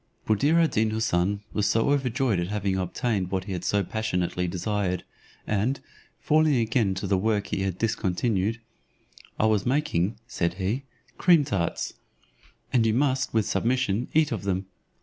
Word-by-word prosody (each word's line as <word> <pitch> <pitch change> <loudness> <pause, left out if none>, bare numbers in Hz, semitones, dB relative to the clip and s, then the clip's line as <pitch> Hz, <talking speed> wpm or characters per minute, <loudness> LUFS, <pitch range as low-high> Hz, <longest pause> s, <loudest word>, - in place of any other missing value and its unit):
Buddir 140 +10 +3
ad 165 -1 +3
Deen 110 +1 +2
Houssun 100 -2 0
was 105 0 +1
overjoyed 125 -3 +1
at 85 - -1
having 100 -1 -1
obtained 95 +1 -1
what 95 -1 -1
he 100 0 -5
had 90 -1 -4
so 100 +2 +1
passionately 90 -3 -1
desired, 95 +1 -1 0.4
and, 110 +6 0 0.4
falling 155 -1 +3
again 115 -4 +1
to 95 - -4
the 95 -1 +1
work 105 0 +1
he 95 - -2
had 95 -2 -2
discontinued 110 0 0 0.8
"I - - +3
was 110 -3 +2
making," 120 - 0
said 85 -7 -1
he, 105 +9 -2 0.3
"cream 170 -5 +5
tarts; 95 - -2 0.8
and 120 -3 +4
you 110 -1 +2
must, 130 -1 +1
with 110 -2 +1
submission, 120 +1 0
eat 155 -2 +4
of - - -2
them. 95 -1 -1
105 Hz, 155 wpm, -26 LUFS, 95-125 Hz, 0.8 s, cream